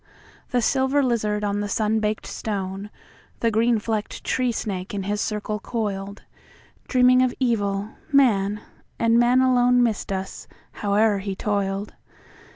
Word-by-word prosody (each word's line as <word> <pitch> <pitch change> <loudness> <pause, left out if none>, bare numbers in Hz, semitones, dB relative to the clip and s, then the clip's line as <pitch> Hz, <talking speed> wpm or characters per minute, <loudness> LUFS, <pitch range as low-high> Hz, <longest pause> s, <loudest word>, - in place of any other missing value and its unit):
The 245 -1 +1
silver 265 +3 +2
lizard 215 -4 0
on 205 0 0
the 205 0 -3
sun 220 +1 +1
baked 215 0 -2
stone, 195 -1 -4 0.5
The 230 - +2
green 230 +2 +3
flecked 215 -1 -3
tree 255 -1 0
snake 195 -3 -4
in 195 - -2
his 205 +2 -2
circle 210 0 -2
coiled, 200 -3 -4 0.6
Dreaming 255 0 +5
of 255 -1 +1
evil, 205 -5 0 0.2
man, 210 -7 +3 0.4
and 230 0 +3
man 245 +2 +4
aloneMissed 245 -4 +2
us, 190 0 -5 0.2
howe'er 205 0 +1
he 195 0 -4
toiled. 200 0 -2
215 Hz, 135 wpm, -23 LUFS, 200-240 Hz, 0.6 s, Dreaming